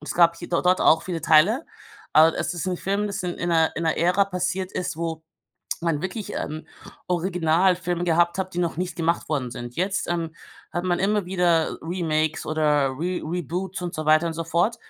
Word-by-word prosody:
es 150 - -6
gab 170 -1 +5
hie 175 - -8
d 170 - +1
dort 180 +1 +3
auch 160 +1 +5
viele 170 -3 -4
Teile, 175 - +4 0.5
aber 160 +1 +6
es - - -2
ist 175 - -4
'n 180 - -1
Film, 200 +3 -1
das 200 0 -4
in 175 -1 -2
in 170 - -3
'ner 160 -1 +3
in 165 - -3
'ner 160 -1 +1
Ära 180 +4 +3
passiert 185 0 -2
ist, 180 -3 -3
wo 165 -1 -4 0.6
man 165 -3 -1
wirklich, 190 +3 -4
ähm, 155 +1 -4 0.4
Originalfilme 175 0 +1
gehabt 170 +1 +2
hat, 185 -1 -3
die - - -3
noch 170 -3 -1
nicht 180 0 -3
gemacht 170 0 0
worden 135 -6 -1
sind. 120 0 -7
Jetzt, 195 +2 -1
ähm, 170 -2 -2 0.4
hat 175 +1 -3
man 175 -1 +1
immer 205 +1 +1
wieder 175 -3 +1
Remakes 160 -2 -1
oder 150 -3 +2
Re 180 +3 -2
Reboots 180 +3 -3
und 175 -1 -4
so 155 - -3
weiter 155 +2 +4
und 165 - -2
so 165 - -3
fort, 175 +8 +1
175 Hz, 205 wpm, -24 LUFS, 160-180 Hz, 0.6 s, aber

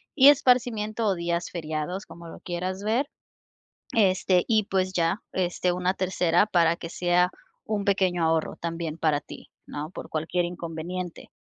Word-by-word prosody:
y 275 0 +9
esparcimiento, 240 -5 +2
o 195 - +2
días 170 0 -2
feriados. 160 +3 -4
Como 170 0 -12
lo - - -10
quieras 185 +2 -4
ver. 240 +7 +1 0.9
Este, 185 -3 +3
y 220 -2 +3
pues 185 -1 0
ya, 170 +4 +1
este, 180 0 0
una 180 +1 0
tercera, 180 0 +2
para 170 -4 +3
que 165 - -7
sea 180 0 +2 0.4
un 210 -2 -2
pequeño 185 -4 +2
ahorro, 160 -1 +1
también 165 -1 -4
para 155 -3 +2
ti, - - -12 0.2
¿no? 150 +2 -5
Por - - -8
cualquier 170 +3 -1
inconveniente. 175 +1 -6
180 Hz, 150 wpm, -26 LUFS, 170-195 Hz, 0.9 s, y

